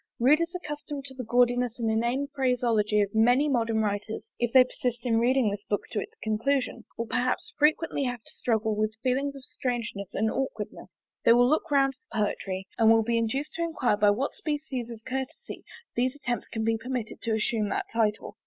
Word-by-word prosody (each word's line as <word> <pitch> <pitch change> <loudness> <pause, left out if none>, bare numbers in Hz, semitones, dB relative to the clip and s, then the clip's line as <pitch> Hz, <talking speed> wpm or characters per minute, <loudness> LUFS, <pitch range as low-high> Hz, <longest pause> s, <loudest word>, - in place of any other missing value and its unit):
Readers 305 +7 +4
accustomed 295 -4 -5
to 265 - -6
the 255 -1 -6
gaudiness 245 0 +2
and 230 -2 -1
inane 235 +5 +1
phraseology 235 -5 +2
of 200 - -5
many 245 +6 +4
modern 230 -5 +1
writers, 210 +1 -3
if 240 -1 0
they 260 0 +8
persist 250 -1 -4
in 225 -2 +3
reading 245 -2 +3
this 200 0 -5
book 205 - 0
to 215 - -1
its - - -7
conclusion, 235 +2 0
will 230 - -2
perhaps 250 +3 -1
frequently 300 -1 +2
have 245 -3 -3
to - - -10
struggle 220 -2 0
with 215 +1 -1
feelings 275 +2 0
of 275 - -10
strangeness 235 -8 -4
and 220 +1 +1
aukwardness: 225 -6 -4 0.3
they 230 - +7
will 245 +1 +5
look 310 +4 +1
round 275 -2 +3
for 240 - -11
poetry, 195 -2 -2
and 225 -1 +6
will 225 0 +6
be 230 +1 +1
induced 265 +6 -2
to 335 - -4
enquire 320 -10 +1
by 205 0 +4
what 245 +8 0
species 285 -6 -3
of 225 -1 -10
courtesy 265 0 -5 0.3
these 255 +3 +1
attempts 245 -4 -3
can 220 - -3
be 225 0 +1
permitted 245 -1 -4
to 225 -1 0
assume 215 -1 0
that - - -1
title. 215 -2 0
240 Hz, 195 wpm, -27 LUFS, 220-265 Hz, 0.3 s, they